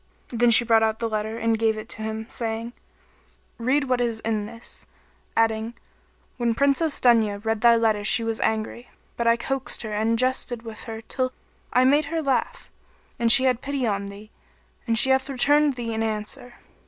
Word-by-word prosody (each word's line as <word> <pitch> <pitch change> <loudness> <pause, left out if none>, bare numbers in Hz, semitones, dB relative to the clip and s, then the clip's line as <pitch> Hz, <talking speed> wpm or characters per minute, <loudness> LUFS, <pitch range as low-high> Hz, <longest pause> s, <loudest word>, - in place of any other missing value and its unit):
Then 240 0 +2
she 235 +1 +6
brought 225 -1 +4
out 220 0 +1
the 230 - -2
letter 220 0 -3
and 230 -1 0
gave 220 -1 +1
it 215 +1 -7
to - - -6
him, 220 0 -4
saying, 230 -1 -4 0.9
"Read 260 +5 +1
what 255 -2 0
is 230 -2 -1
in 215 -2 -2
this;" 230 +1 -10 0.5
adding 225 +1 0 0.6
"When 235 -2 0
Princess 280 +3 +1
Dunya 225 -4 +3
read 225 -1 -1
thy 235 0 +6
letter 220 -2 +1
she 230 +2 +4
was 225 0 -3
angry; 220 +2 -2 0.3
but 235 - -2
I 230 0 +4
coaxed 270 +2 -4
her 215 - -6
and 220 +2 0
jested 255 -1 -1
with 225 -2 -9
her 225 -1 -7
till 255 +3 -3 0.4
I 250 +1 +3
made 290 +3 +3
her 325 +2 -3
laugh, 275 -2 -1 0.5
and 230 -1 +4
she 260 - +8
had 255 -2 +1
pity 280 -2 -2
on 200 -2 -2
thee 205 +2 -12 0.6
and 230 -1 +1
she 265 +3 +5
hath 265 +1 +1
returned 290 +2 +3
thee 235 -2 -4
an 220 - -2
answer." 220 +2 -4
230 Hz, 190 wpm, -24 LUFS, 220-255 Hz, 0.9 s, she